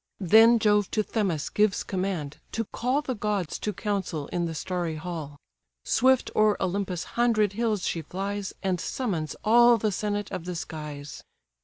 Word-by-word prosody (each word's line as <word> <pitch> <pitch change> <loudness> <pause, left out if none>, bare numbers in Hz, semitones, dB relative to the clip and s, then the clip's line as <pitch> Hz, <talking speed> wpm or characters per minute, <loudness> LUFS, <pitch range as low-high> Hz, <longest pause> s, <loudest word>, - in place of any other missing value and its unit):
Then 225 +5 +6
Jove 210 -2 +3
to 215 - +3
Themis 190 -10 -1
gives 210 -2 +2
command, 185 -7 -3
to 225 - -1
call 255 +8 -1
The 260 - -2
gods 205 -6 -2
to 210 - -2
council 195 -8 -3
in 175 -1 -1
the 165 -1 -4
starry 175 -1 -2
hall: 155 -3 -6 0.5
Swift 260 0 +3
o'er 215 -1 +4
Olympus' 185 -1 -2
hundred 225 -4 +1
hills 215 -3 0
she 165 - -1
flies, 195 +4 -4
And 185 -3 0
summons 180 - -2
all 235 +2 +6
the 215 -1 0
senate 205 +1 -2
of 170 - -5
the 180 0 -4
skies. 150 -3 -7
195 Hz, 160 wpm, -27 LUFS, 170-215 Hz, 0.5 s, Then